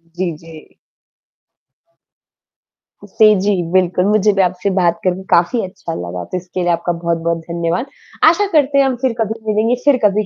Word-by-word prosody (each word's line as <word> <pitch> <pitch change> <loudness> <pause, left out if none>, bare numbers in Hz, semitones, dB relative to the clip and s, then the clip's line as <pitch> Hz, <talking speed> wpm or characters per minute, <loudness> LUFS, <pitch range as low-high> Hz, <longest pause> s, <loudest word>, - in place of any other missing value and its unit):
जी, 180 -1 -2
जी। 165 -1 -15 2.3
से 215 +2 +4
जी, 205 +1 +1 0.2
बिल्कुल 180 0 +2
मुझे 210 0 +3
भी 195 - +2
आपसे 180 +1 0
बात 170 -1 +1
करके 185 0 -1
काफ़ी 175 +7 +3
अच्छा 175 -2 -8
लगा 90 - -5
तो 185 - -2
इसके 180 +1 -5
लिए 175 0 +1
आपका 170 +1 -1
बहुत-बहुत 170 0 -1
धन्यवाद। 170 +6 -2 0.4
आशा 340 +6 +5
करते 285 -2 +3
हैं 275 - +5
हम 265 -1 0
फ़िर 255 - +1
कभी 220 +1 -2
मिलेंगे 220 +3 +1
फ़िर 285 -3 +5
कभी 210 +1 +2
185 Hz, 165 wpm, -17 LUFS, 170-215 Hz, 2.3 s, आशा